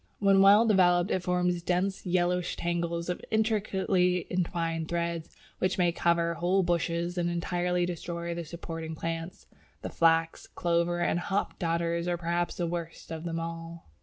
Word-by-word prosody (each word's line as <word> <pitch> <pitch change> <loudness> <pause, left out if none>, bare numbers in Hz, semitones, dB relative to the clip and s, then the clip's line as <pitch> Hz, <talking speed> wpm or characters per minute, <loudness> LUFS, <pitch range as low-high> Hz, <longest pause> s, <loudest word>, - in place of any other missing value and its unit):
When 195 -1 +4
well 205 +3 +7
developed 180 -4 +4
it 185 - +1
forms 180 0 0
dense 185 +3 -1
yellowish 180 0 +1
tangles 170 0 -2
of 180 - -3
intricately 195 -5 +1
entwined 165 -2 -1
threads, 170 -1 -2 0.3
which 185 0 0
may 175 -2 +3
cover 170 0 +1
whole 180 +3 +1
bushes 170 0 -1
and 175 0 0
entirely 175 +1 0
destroy 170 0 -4
the 170 0 -4
supporting 165 0 -6
plants. 165 +3 -5 0.4
The - - -3
Flax, 165 0 +2
Clover, 170 0 0
and 175 - +1
Hop 195 +3 -2
Dodders 170 0 0
are 175 -1 0
perhaps 170 +1 -1
the 175 - -1
worst 170 -1 -5
of 160 +1 -5
them 165 -1 -2
all. 165 - -7
175 Hz, 155 wpm, -29 LUFS, 170-180 Hz, 0.4 s, well